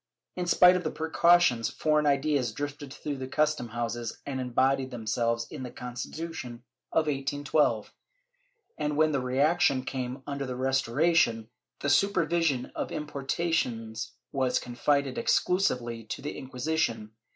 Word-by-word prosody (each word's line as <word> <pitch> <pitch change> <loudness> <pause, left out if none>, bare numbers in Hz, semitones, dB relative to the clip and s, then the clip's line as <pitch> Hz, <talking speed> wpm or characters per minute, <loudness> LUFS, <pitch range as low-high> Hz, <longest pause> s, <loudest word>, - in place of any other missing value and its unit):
In 180 -1 -3
spite 180 +1 +7
of 180 - -2
precautions, 160 -6 +4
foreign 150 -1 +1
ideas 140 -3 +2
drifted 145 +1 -5
through 145 0 -5
the 130 0 -5
custom 150 -2 +1
houses 120 0 -3
and 135 -2 -3
embodied 130 +1 +1
themselves 115 0 -1
in - - -7
the 125 - -5
Constitution 125 +1 -6 0.3
of 160 - +2
1812 145 +1 0 0.9
and, 150 -1 -1
when 155 0 +4
the 140 - +1
reaction 140 +2 +2
came 130 0 -4
imder 140 -1 -3
the 125 - -4
Restoration, 130 -2 +2 0.3
the 140 - 0
supervision 165 -5 +2
of - - -4
importations 135 -7 -2 0.2
was 130 -2 +1
confided 135 +2 0
exclusively 125 -11 +1
to - - -6
the 145 - -4
Inquisition. 130 -4 -2
135 Hz, 130 wpm, -28 LUFS, 125-155 Hz, 0.9 s, spite